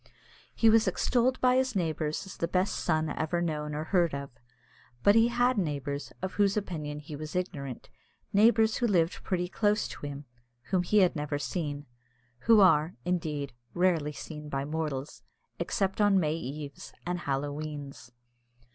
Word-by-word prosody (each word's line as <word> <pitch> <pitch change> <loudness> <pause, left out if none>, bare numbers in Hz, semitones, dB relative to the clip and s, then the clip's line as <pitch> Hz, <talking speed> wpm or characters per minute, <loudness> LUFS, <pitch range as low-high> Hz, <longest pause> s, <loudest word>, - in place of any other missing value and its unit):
He 225 - +3
was 225 +1 +5
extolled 255 +1 +1
by 255 0 +4
his 260 -3 +1
neighbours 160 -2 -1
as 190 - -9
the 170 - -1
best 185 +3 +1
son 155 -2 0
ever 160 +2 -1
known 150 -3 -2
or 155 - -2
heard 170 -2 +2
of. 140 -1 -6 0.7
But 200 - +7
he 225 +1 +5
had 245 0 +2
neighbours, 145 -4 -3
of 185 - -2
whose 200 0 +2
opinion 155 -7 -3
he 150 0 -8
was 155 +3 -7
ignorant 140 -8 -4 0.5
neighbours 220 +1 +5
who 240 - +1
lived 175 -5 +1
pretty 180 -2 -1
close 210 +3 +1
to - - -10
him, 140 0 -7 0.5
whom 185 -2 +3
he 205 +4 +3
had 180 -2 +3
never 150 -1 -2
seen, 145 -1 -3 0.6
who 225 -2 +7
are, 160 -3 +4
indeed, 155 -6 -2 0.2
rarely 175 -5 +2
seen 150 0 -8
by 135 -1 -2
mortals, 150 -2 -4 0.4
except 195 +1 0
on 205 -2 +5
May 155 -3 +1
eves 145 -2 -6
and 175 0 -2
Halloweens. 145 -2 -4
165 Hz, 160 wpm, -29 LUFS, 150-195 Hz, 0.7 s, But